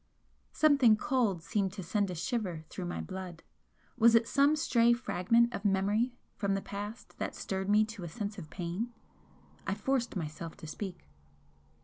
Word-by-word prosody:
Something 275 -8 +5
cold 215 -10 +1
seemed 195 -1 0
to 195 -2 -6
send 200 +3 0
a 180 - -4
shiver 180 -4 -2
through 185 - -5
my 175 - -3
blood 185 -3 -7 0.5
was 235 -1 +6
it 230 0 +4
some 285 +2 +4
stray 240 -6 +4
fragment 235 +1 +2
of 200 - -4
memory 205 +5 +1 0.2
from 200 -2 0
the 195 - -1
past 205 +3 -7
that - - -3
stirred 190 0 -3
me 210 +1 +5
to 215 -3 -8
a 170 - -5
sense 205 +3 -5
of 155 -4 -9
pain? 180 +8 -3 0.8
I - - 0
forced 265 -4 -1
myself 165 -1 -5
to 190 - -10
speak. 180 +4 -6
205 Hz, 165 wpm, -31 LUFS, 185-235 Hz, 0.8 s, was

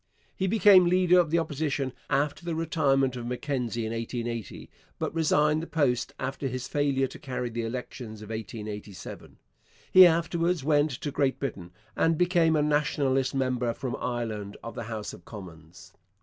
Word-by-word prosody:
He 190 - -1
became 195 -2 +6
leader 180 0 +4
of 170 -3 +2
the 165 - +2
Opposition 145 -4 -1 0.2
after 145 +3 0
the 170 -1 -3
retirement 140 -5 +1
of 120 -1 -5
Mackenzie 125 -3 -2
in 110 - -3
1880, 115 -1 -4 0.3
but - - -3
resigned 155 -1 +2
the 165 - -6
post 130 -6 0
after 135 +1 -3
his 130 0 -4
failure 140 -2 +1
to - - -8
carry 125 -3 -4
the 115 +1 -3
elections 115 -2 -6
of 105 - -11
1887. 105 -3 -7 0.5
He 185 -1 +10
afterwards 170 -1 +1
went 150 +1 +3
to 145 +2 -4
Great 135 -1 +1
Britain, 90 -10 -5 0.2
and 165 -1 +2
became 175 -2 +3
a 150 - +2
Nationalist 140 -3 +1
member 125 -3 0
from 130 -2 -4
Ireland 110 -5 -4
of 115 - -6
the 115 - -6
House 110 -2 -5
of 85 - -12
Commons. 85 -5 -12
135 Hz, 165 wpm, -27 LUFS, 115-160 Hz, 0.5 s, He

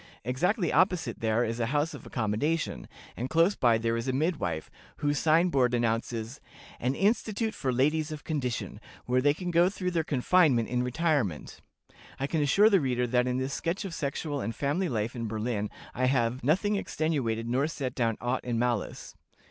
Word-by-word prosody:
Exactly 175 - 0
opposite 180 - +2
there 110 +1 +1
is 115 +1 -2
a 115 - 0
house 145 +4 0
of - - -10
accommodation, 110 - -1 0.3
and 125 +3 -4
close 165 +6 +4
by 120 -3 +3
there 115 0 0
is 115 +2 -3
a - - +2
midwife, 135 - -1 0.3
whose 145 -1 0
sign 165 +3 +4
board 125 -5 +2
announces 115 +1 -2 0.4
'An 130 +3 0
institute 220 +2 0
for 130 - -2
ladies 150 +5 +1
of 155 -1 -7
condition, 125 - -3 0.3
where 125 +1 +2
they 145 +2 +3
can 180 +1 -4
go 170 +2 +4
through 185 -2 -3
their 165 -2 0
confinement 145 -3 +3
in 125 0 0
retirement.' 125 - -1 0.6
I 135 - 0
can 155 +2 0
assure 170 +9 +5
the 195 -4 +5
reader 125 -2 0
that 125 +1 +1
in 125 0 0
this 130 +1 -2
sketch 175 +5 -2
of 185 - -5
sexual 145 -1 -3
and 115 - -3
family 160 +7 0
life 115 -1 -2
in 115 -2 -3
Berlin 110 -1 -2 0.2
I 130 - 0
have 125 -1 +1
'nothing 195 - +2
extenuated, 130 - -1
nor 130 +5 +1
set 140 -5 -4
down 115 -3 0
aught 125 +2 -1
in 120 -2 -2
malice.'" 120 -2 -2
130 Hz, 185 wpm, -28 LUFS, 120-160 Hz, 0.6 s, assure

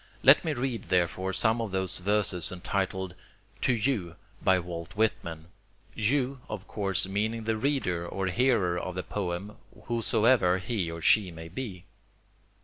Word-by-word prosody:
Let - - +8
me 160 -3 0
read 125 -2 -2
therefore 90 +1 +1
some 110 +5 +2
of 110 - -2
those 95 -1 -1
verses 95 -2 +1
entitled 95 0 -2 0.5
"To - - +3
You" 110 -8 0 0.3
by 95 -1 +4
Walt 85 0 -6
Whitman 85 -7 -1 0.5
"You" 130 +4 0
of 105 -2 -6
course 95 -3 0
meaning 110 +3 -1
the 110 0 0
reader 110 -9 0
or 95 +2 -3
hearer 95 -4 +2
of 90 +1 -5
the 90 - -3
poem 100 +1 -4 0.3
whosoever 115 -4 +3
he 95 -2 -2
or 85 -1 -6
she 105 -4 +5
may 80 -1 -9
be. 95 -3 -6
95 Hz, 145 wpm, -29 LUFS, 90-115 Hz, 0.5 s, Let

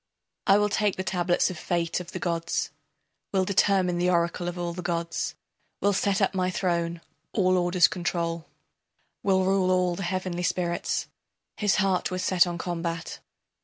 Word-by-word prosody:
I 195 0 +7
will 210 0 +2
take 205 -1 +1
the 185 - -3
tablets 175 -1 +1
of 175 - -8
fate 170 0 -1
of 180 -1 -8
the - - -4
gods, 170 -1 -1 0.6
Will 190 -1 +2
determine 185 -2 +2
the 180 +1 +2
oracle 170 0 +1
of 175 0 -4
all 175 -1 -2
the 180 - -5
gods, 170 -1 -2 0.4
Will 205 0 +2
set 195 +1 +1
up 195 - +1
my 185 -1 +1
throne, 170 -2 -1 0.3
all 185 -3 +3
orders 175 -1 +4
control, 170 -1 -2 0.7
Will 190 -1 +2
rule 190 -1 +2
all 180 -1 +2
the 190 - -6
heavenly 185 -1 -2
spirits. 175 -1 -1 0.5
His 205 -2 +2
heart 195 -3 +1
was 185 -1 -3
set 180 -1 +4
on 175 -1 -3
combat. 165 -1 -4
180 Hz, 165 wpm, -27 LUFS, 170-190 Hz, 0.7 s, I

